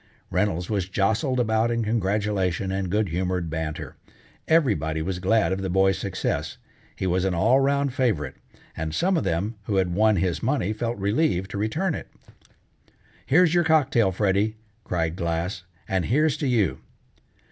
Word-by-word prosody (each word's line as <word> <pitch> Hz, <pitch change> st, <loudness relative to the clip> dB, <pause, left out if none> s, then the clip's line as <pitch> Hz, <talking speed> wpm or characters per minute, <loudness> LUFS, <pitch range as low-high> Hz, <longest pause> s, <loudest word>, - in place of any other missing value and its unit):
Reynolds 90 Hz, -2 st, 0 dB
was 100 Hz, -4 st, -2 dB
jostled 110 Hz, +7 st, +1 dB
about 110 Hz, -1 st, +2 dB
in 115 Hz, -1 st, 0 dB
congratulation 100 Hz, -3 st, 0 dB
and 95 Hz, -1 st, -2 dB
good 105 Hz, +1 st, +1 dB
humored 90 Hz, -1 st, -2 dB
banter. 80 Hz, -1 st, -4 dB, 0.5 s
Everybody 105 Hz, -, +2 dB
was 90 Hz, +1 st, -3 dB
glad 100 Hz, +2 st, +2 dB
of 95 Hz, +1 st, -1 dB
the 95 Hz, -, -2 dB
boy's 95 Hz, 0 st, +2 dB
success, -, -, -3 dB, 0.4 s
he -, -, -4 dB
was 90 Hz, 0 st, +1 dB
an 95 Hz, -2 st, 0 dB
all 115 Hz, +10 st, +4 dB
round 140 Hz, 0 st, +1 dB
favorite, 105 Hz, -, 0 dB, 0.4 s
and 80 Hz, 0 st, -4 dB
some 190 Hz, +2 st, +2 dB
of 165 Hz, -, +1 dB
the -, -, 0 dB
men 105 Hz, +5 st, -3 dB
who 105 Hz, -, -1 dB
had 95 Hz, -2 st, +1 dB
won 110 Hz, +3 st, +3 dB
his 90 Hz, -1 st, 0 dB
money 115 Hz, -6 st, 0 dB
felt 115 Hz, +2 st, -3 dB
relieved 100 Hz, -, 0 dB
to 100 Hz, -, -4 dB
return 155 Hz, -, 0 dB
it. -, -, -6 dB, 1.2 s
"Here's 170 Hz, +3 st, +4 dB
your 175 Hz, -1 st, +4 dB
cocktail, 135 Hz, -, +3 dB
Freddy," 100 Hz, +3 st, +1 dB, 0.3 s
cried 80 Hz, -2 st, -1 dB
Glass, 85 Hz, +1 st, -3 dB, 0.2 s
"and 95 Hz, -3 st, 0 dB
here's 150 Hz, -, +2 dB
to 145 Hz, -, -2 dB
you!" 105 Hz, -, +1 dB
100 Hz, 165 wpm, -25 LUFS, 90-120 Hz, 1.2 s, all